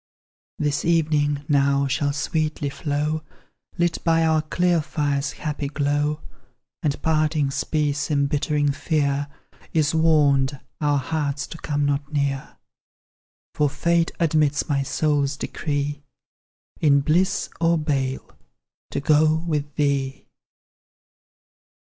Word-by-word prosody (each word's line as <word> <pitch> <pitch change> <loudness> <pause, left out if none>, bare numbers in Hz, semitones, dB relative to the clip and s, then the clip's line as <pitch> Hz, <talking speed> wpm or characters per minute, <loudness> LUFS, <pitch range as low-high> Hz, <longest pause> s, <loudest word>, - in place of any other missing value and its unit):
This 150 -1 0
evening 150 -3 +1
now 140 -1 +3
shall 140 +2 0
sweetly 150 0 -1
flow, 150 +2 -2 0.6
Lit 175 -1 0
by 165 -1 +3
our 160 -1 +3
clear 175 +2 +1
fire's 145 -2 -1
happy 150 -2 -4
glow; 145 +1 0 0.6
And 145 -2 -1
parting's 155 -3 +1
peace 150 -1 -1
embittering 145 0 +1
fear, 145 -1 0 0.5
Is 155 -2 +2
warned 145 -4 +3 0.2
our 145 -1 +2
hearts 145 0 -2
to 165 - -10
come 145 -1 -1
not 140 0 -1
near; 140 -2 -2 1.0
For 150 -1 +2
fate 170 +3 +1
admits 155 -3 +2
my 140 -3 +1
soul's 145 0 0
decree, 145 0 -3 0.8
In 140 -2 +4
bliss 180 +7 +1
or 170 0 +3
bale 135 -4 -1 0.6
to - - -2
go 155 +1 +4
with 150 -2 -2
thee! 140 -2 -1
145 Hz, 110 wpm, -23 LUFS, 140-155 Hz, 1.0 s, In